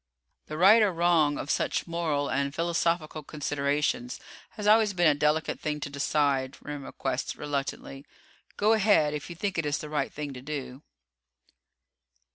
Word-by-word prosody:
"The 155 - -6
right 200 +7 +7
or 210 -2 +3
wrong 165 -4 +2
of 145 - -3
such - - 0
moral 160 -4 -1
and 140 +1 -1
philosophical 165 -2 0
considerations 150 - -2 0.4
has 210 - -4
always 215 -1 +5
been 175 -2 +2
a 155 - +6
delicate 150 +2 0
thing 150 -1 -3
to 145 - -5
decide," 140 -2 0
Remm 145 -2 -7
acquiesced - - -3
reluctantly. 140 -1 -5 0.5
"Go 215 +2 +4
ahead 200 -9 +3
if 150 -1 -5
you 170 - -7
think 190 0 -2
it 160 - -1
is 145 - 0
the 150 - -7
right 150 -1 -1
thing 145 -2 -6
to 125 - -9
do." 135 -2 -6
150 Hz, 160 wpm, -28 LUFS, 145-175 Hz, 0.5 s, right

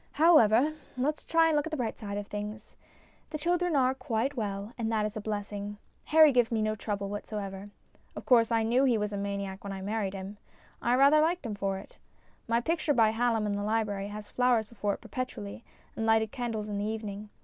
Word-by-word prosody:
However, 295 -4 +5 0.2
let's 295 +4 -1
try 330 0 +3
and 315 - +2
look 295 +1 +1
at - - -7
the 310 - -2
bright 235 -4 -2
side 205 -2 -5
of 205 - -4
things. 210 +1 -7 0.5
The 305 - -4
children 350 +1 +1
are 260 -1 +3
quite 255 +1 -2
well, 205 -1 -4
and 225 -2 -2
that 215 -1 +1
is 215 +1 -4
a 215 - -4
blessing. 205 -1 -4 0.3
Harry 310 -1 +7
gives 245 -3 +2
me 225 - +1
no 215 0 +1
trouble 200 -1 -3
whatever. 200 -1 -5 0.5
Of - - -7
course 235 -2 +5
I 225 -1 +3
knew 240 +4 +3
he 245 -4 +3
was 210 0 -2
a - - -2
maniac 200 -1 -4
when 200 -1 -5
I 190 - -6
married 200 -1 -2
him; 195 +2 -7 0.4
I 240 +1 +2
rather 280 +4 +6
liked 335 -1 0
him 225 - -3
for 195 -1 -2
it. - - -13 0.5
My 230 0 +2
picture 310 +2 0
by 220 -2 +5
Hallom 225 -1 +1
in 210 - -1
the 205 0 -2
library 205 -2 -1
has 210 0 -7
flowers 245 -3 +2
before 205 -2 -2
it - - -16
perpetually, 115 - -6 0.3
and 225 - -3
lighted 220 -1 +3
candles 225 -4 -3
in 205 -1 -3
the 205 - -1
evening. 210 -1 -5
220 Hz, 215 wpm, -29 LUFS, 205-250 Hz, 0.5 s, Harry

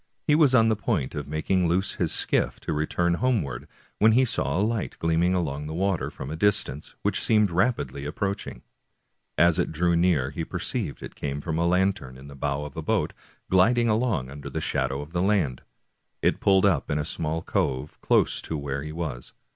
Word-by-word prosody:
He 150 - +3
was 150 -4 +5
on 115 -2 +5
the 110 - +3
point 100 - -1
of 75 -1 -5
making 85 +4 0
loose 90 +4 0
his - - 0
skiff - - +1
to - - -3
return 85 +3 0
homeward 100 - 0 0.3
when 110 +1 +6
he 130 +3 +5
saw 70 - 0
a 95 - +2
light 115 -2 -2
gleaming 85 +2 +2
along 75 -4 -2
the 80 - -5
water 95 -1 0
from 65 - -7
a - - -3
distance, 80 -5 0
which - - 0
seemed 105 -4 +3
rapidly 90 - 0
ap 75 - -6
proaching. 100 - -3 0.8
As 85 -1 +4
it - - 0
drew 85 +2 +1
near 85 -6 +2
he 80 +2 -4
perceived 90 - -4
it - - -8
came 70 0 -4
from 80 +2 -3
a 85 - +2
lantern 90 -8 0
in 65 +2 -12
the 70 - -11
bow 70 +1 -2
of 75 - -9
a 80 - -4
boat - - 0 0.3
gliding 115 +6 +4
along 110 - 0
under 70 +1 -5
shadow 65 +2 -1
of 75 +3 -10
the 85 - 0
land. 95 -11 +1 0.6
It - - +2
pulled 95 0 +4
up 85 -9 +2
in 75 - 0
a 75 - -1
small 80 +2 -3
cove 65 +3 -2
close - - +2
to 80 - -4
where 70 -1 -3
he 75 +2 -6
was. 75 -7 -5
85 Hz, 205 wpm, -26 LUFS, 75-100 Hz, 0.8 s, when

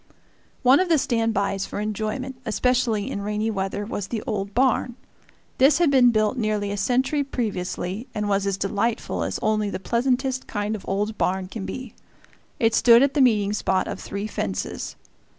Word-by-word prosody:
One 255 +3 +6
of 370 -1 +1
the 325 - +5
stand 230 -4 +1
bys 195 -1 -1
for - - -5
enjoyment, 215 +5 -3
especially 235 -2 0
in 200 - -3
rainy 210 +2 -1
weather, 195 0 -3
was 205 -2 -4
the 225 0 -4
old 200 -2 -3
barn. 250 -1 +2 0.6
This 275 +2 +6
had 335 -4 +3
been 255 -3 +6
built 215 +1 +1
nearly 210 -2 -1
a - - -2
century 260 +7 +1
previously, 210 -3 -3
and 210 -1 -1
was 200 -1 +1
as 195 -1 0
delightful 205 +4 -1
as - - -2
only 215 -1 +1
the - - -4
pleasantest 255 +5 0
kind 205 0 -2
of 205 - -8
old 210 +2 -1
barn 185 0 0
can 195 -1 -6
be. 255 -4 -6 0.7
It 225 -1 +3
stood 235 +2 +6
at 280 0 +2
the 290 - +2
meeting 210 -5 +3
spot 190 -2 0
of - - -5
three 200 +1 -5
fences. 95 - -4
215 Hz, 180 wpm, -24 LUFS, 200-250 Hz, 0.7 s, One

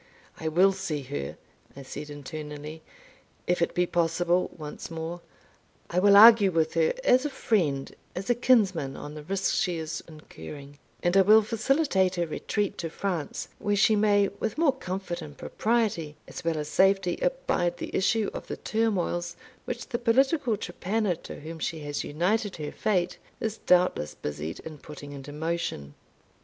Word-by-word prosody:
"I 160 - -3
will 180 +5 +5
see 190 -7 -3
her," 70 - -5 0.4
I 140 - -8
said 145 +3 -7
internally, 150 +1 -7 0.6
"if 180 0 +1
it 170 - 0
be 180 - +3
possible, 175 +1 +1
once 150 -2 -7
more. 165 +1 -5 0.7
I 175 - +2
will 200 +1 +7
argue 220 -2 +9
with 160 -3 +1
her 480 +1 +2
as 255 - +5
a 295 - -1
friend 165 - 0 0.2
as 190 +2 -4
a 245 - +4
kinsman 200 - +2
on 145 0 -7
the 150 - -7
risk 190 +5 -1
she 180 -4 0
is 160 0 -4
incurring, 145 -2 -11 0.2
and 175 +1 +2
I 195 - +8
will 215 +3 +7
facilitate 220 - +1
her 175 -1 0
retreat 205 +5 -2
to 165 - -3
France, 170 -3 -3
where 205 0 0
she 215 +2 +4
may, 205 -1 +3
with - - -2
more 310 -4 +4
comfort 185 -7 -5
and 150 -2 -10
propriety, 210 -10 -1
as - - -8
well 165 -1 0
as 150 -1 -3
safety, 190 +1 +3
abide - - 0
the - - -5
issue 210 +2 +2
of - - -7
the - - -5
turmoils 180 -6 -1 0.3
which 240 0 -5
the 235 -3 -2
political 255 0 +2
trepanner, 200 +1 -1
to - - -9
whom 160 +2 -7
she 160 0 -3
has 145 0 -3
united 195 +7 0
her 150 -2 -5
fate, 180 -4 0 0.2
is 220 -1 -3
doubtless 180 - +3
busied 75 +2 -5
in 155 -2 -9
putting 145 -1 -10
into 140 0 -8
motion." 150 - -3
180 Hz, 170 wpm, -27 LUFS, 155-210 Hz, 0.7 s, argue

